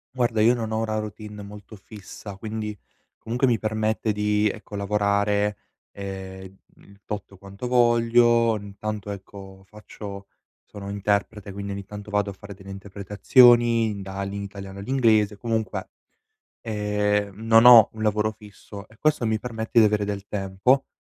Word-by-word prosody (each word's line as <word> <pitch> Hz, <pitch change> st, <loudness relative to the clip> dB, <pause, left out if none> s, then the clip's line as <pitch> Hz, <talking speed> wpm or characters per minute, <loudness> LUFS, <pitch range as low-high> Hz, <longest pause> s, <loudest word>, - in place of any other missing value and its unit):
Guarda, 120 Hz, -3 st, +1 dB
io 115 Hz, +3 st, +5 dB
non 110 Hz, -2 st, -4 dB
ho 110 Hz, 0 st, 0 dB
una 110 Hz, -1 st, -2 dB
routine 105 Hz, -1 st, -8 dB
molto 105 Hz, +1 st, -11 dB
fissa, 100 Hz, -1 st, -11 dB
quindi 110 Hz, 0 st, -5 dB, 0.4 s
comunque 120 Hz, +4 st, -1 dB
mi 120 Hz, -3 st, +2 dB
permette 110 Hz, 0 st, -1 dB
di, 105 Hz, 0 st, +1 dB
ecco, 105 Hz, -, -8 dB
lavorare, 100 Hz, 0 st, +1 dB, 0.3 s
ehm, 95 Hz, -1 st, -8 dB, 0.2 s
il 100 Hz, 0 st, -20 dB
tot 100 Hz, -2 st, -6 dB
quanto 100 Hz, +4 st, -8 dB
voglio, 120 Hz, -1 st, +4 dB
intanto, 105 Hz, +1 st, -6 dB
ecco, 95 Hz, -1 st, -10 dB
faccio 100 Hz, -1 st, -10 dB, 0.4 s
sono 100 Hz, -1 st, -8 dB
interprete 100 Hz, 0 st, -2 dB
quindi 100 Hz, 0 st, -5 dB
ogni 100 Hz, 0 st, -6 dB
tanto 105 Hz, +1 st, -9 dB
vado 105 Hz, 0 st, +1 dB
a -, -, -10 dB
fare 100 Hz, +1 st, -11 dB
delle 100 Hz, 0 st, -12 dB
interpretazioni, 105 Hz, +3 st, +3 dB
dal 95 Hz, 0 st, -5 dB
in 100 Hz, -, -4 dB
Italiano 100 Hz, 0 st, -9 dB
all'inglese, 110 Hz, -3 st, +2 dB
comunque 110 Hz, -3 st, -3 dB, 0.7 s
ehm, 105 Hz, -1 st, -1 dB
non 115 Hz, +1 st, +4 dB
ho 120 Hz, -3 st, +10 dB
un 110 Hz, -, -7 dB
lavoro 105 Hz, 0 st, +1 dB
fisso 105 Hz, -1 st, -12 dB
e 110 Hz, -, -20 dB
questo 155 Hz, -5 st, +1 dB
mi 110 Hz, 0 st, +1 dB
permette 115 Hz, 0 st, -2 dB
di 110 Hz, -, +7 dB
avere 105 Hz, -1 st, +1 dB
del 100 Hz, -1 st, -5 dB
tempo, 100 Hz, +7 st, +1 dB
105 Hz, 150 wpm, -24 LUFS, 100-110 Hz, 0.7 s, ho